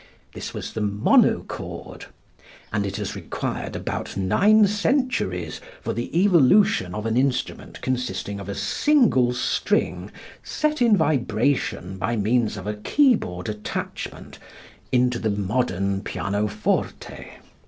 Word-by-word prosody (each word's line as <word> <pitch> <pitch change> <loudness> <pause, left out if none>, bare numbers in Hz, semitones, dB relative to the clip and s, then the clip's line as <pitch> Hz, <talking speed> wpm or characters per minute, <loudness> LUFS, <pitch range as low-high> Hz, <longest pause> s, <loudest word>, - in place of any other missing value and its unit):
This - - -6
was - - -6
the 110 - -3
monochord, 105 0 +1 0.7
and 100 -2 0
it 100 - -5
has 105 -2 -4
required - - -4
about - - -4
nine 205 - +4
centuries 200 - -1 0.2
for - - -3
the 120 - -2
evolution 185 - +4
of 105 +1 -4
an 115 0 0
instrument 130 -1 -1
consisting 110 -6 -3
of 100 0 -8
a 100 - -3
single 130 - +3
string 125 - 0 0.3
set 305 -2 -1
in 230 -4 +5
vibration 120 - 0
by 115 +6 -1
means 110 0 +1
of 95 - -7
a 105 - -2
keyboard 105 - +1
attachment 105 -1 -6 0.5
into 125 -1 +2
the 110 - 0
modern 100 -1 -1
pianoforte. 105 +2 -2
115 Hz, 120 wpm, -23 LUFS, 100-160 Hz, 0.7 s, in